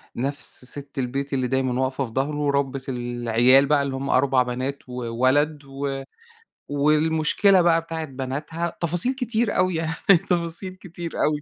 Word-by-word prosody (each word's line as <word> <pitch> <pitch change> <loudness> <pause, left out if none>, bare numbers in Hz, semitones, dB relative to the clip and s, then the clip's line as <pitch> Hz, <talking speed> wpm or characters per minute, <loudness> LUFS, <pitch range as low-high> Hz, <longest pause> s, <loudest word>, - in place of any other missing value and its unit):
نفس 135 0 -3
سِت 140 +2 -5
البيت 135 +3 -3
اللي 130 -2 0
دايمًا 130 0 0
واقفة 130 +1 -1
في 115 - -10
ضهره 135 +5 -1
ورَبِّت 140 -2 -1
العيال 120 +1 +3
بقى 145 0 +3
اللي 135 -1 -3
هم 135 +1 -4
4 130 -1 +3
بنات 130 +2 -4
وولد 130 +5 0
و 135 0 -4 0.7
والمشكلة 155 +6 +3
بقى 165 -1 +3
بتاعة 165 -1 -5
بناتها 145 +5 -4
تفاصيل 175 - +1
كتير 235 -4 -1
أوي 185 -1 +2
يعني 160 0 -1 0.3
تفاصيل 175 +1 -2
كتير 175 -2 -8
أوي. 150 -1 +1
140 Hz, 145 wpm, -23 LUFS, 130-165 Hz, 0.7 s, العيال